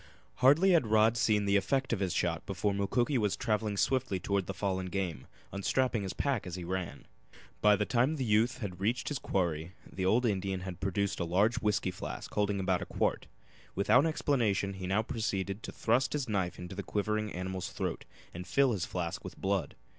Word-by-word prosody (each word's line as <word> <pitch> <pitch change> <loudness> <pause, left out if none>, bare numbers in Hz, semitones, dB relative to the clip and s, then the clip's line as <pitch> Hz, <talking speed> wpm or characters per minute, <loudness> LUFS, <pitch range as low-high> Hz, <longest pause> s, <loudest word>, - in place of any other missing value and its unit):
Hardly 145 +9 +5
had 165 -9 +4
Rod 110 +1 +4
seen 105 -3 +2
the 100 0 +2
effect 135 +7 0
of 110 - -1
his 95 -3 0
shot 85 -1 0
before 100 +1 0
Mukoki 120 +7 +1
was 105 -3 0
traveling 110 -3 -1
swiftly 125 -5 +1
toward 100 0 -1
the 95 - -3
fallen 95 0 -1
game, 90 -8 -3 0.2
unstrapping 115 +4 0
his 95 -2 -4
pack 135 -9 -1
as 90 - -5
he 90 - -6
ran. 90 -4 -4 0.6
By 105 0 +6
the 105 - 0
time 125 +8 +2
the 135 - -2
youth 115 +3 +2 0.2
reached 115 +6 0
his 145 - -2
quarry 85 -2 -1
the 95 - -5
old 120 +6 +3
Indian 95 -3 -1
had 95 -1 -6
produced 100 +1 -1
a - - 0
large 100 +8 +2
whisky 105 -5 0
flask 90 - -7
holding 105 -1 +1
about 95 -1 +1
a - - -5
quart. - - -1 0.5
Without 125 - +4
explanation 115 -11 +1
he 95 -1 -6
now 100 +4 +1
proceeded 100 -3 -2
to - - -6
thrust 125 +3 +1
his 145 -3 -1
knife 95 -5 -1
into 90 0 -7
the - - -4
quivering 105 0 -1
animal's 95 0 -4
throat - - -4 0.3
and 90 +1 -7
fill 135 +7 +3
this 95 -6 -2
flask 85 -2 -3
with - - -8
blood. 95 -2 -1
100 Hz, 195 wpm, -31 LUFS, 95-115 Hz, 0.6 s, By